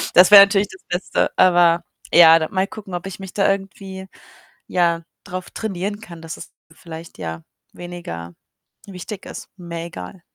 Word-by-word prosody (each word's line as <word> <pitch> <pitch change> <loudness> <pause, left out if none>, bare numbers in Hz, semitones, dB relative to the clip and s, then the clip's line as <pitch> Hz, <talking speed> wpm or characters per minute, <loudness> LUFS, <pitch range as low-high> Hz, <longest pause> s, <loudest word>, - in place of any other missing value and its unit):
Das 180 +2 +8
wäre 200 -1 +12
natürlich 200 0 +1
das 190 - -14
Beste. 180 +1 -1
Aber, 175 -2 +4 0.3
ja, 165 -1 +9
da 160 - -3
mal 190 +1 0
gucken, 200 -4 -10
ob 175 +2 -4
ich 195 - -8
mich 190 -1 -9
da 200 - +2
irgendwie, 190 0 -6 0.6
ja, 170 -2 +1 0.2
drauf 185 -2 -7
trainieren 205 -1 -4
kann, 170 -5 -11
dass 165 0 -7
es - - -11 0.2
vielleicht, 165 -1 -11
ja, 80 0 -6 0.3
weniger 130 - -8 0.5
wichtig 190 +1 -8
ist, - - -9
mehr 170 -1 -6
egal. 170 - -9
180 Hz, 160 wpm, -21 LUFS, 170-195 Hz, 0.6 s, wäre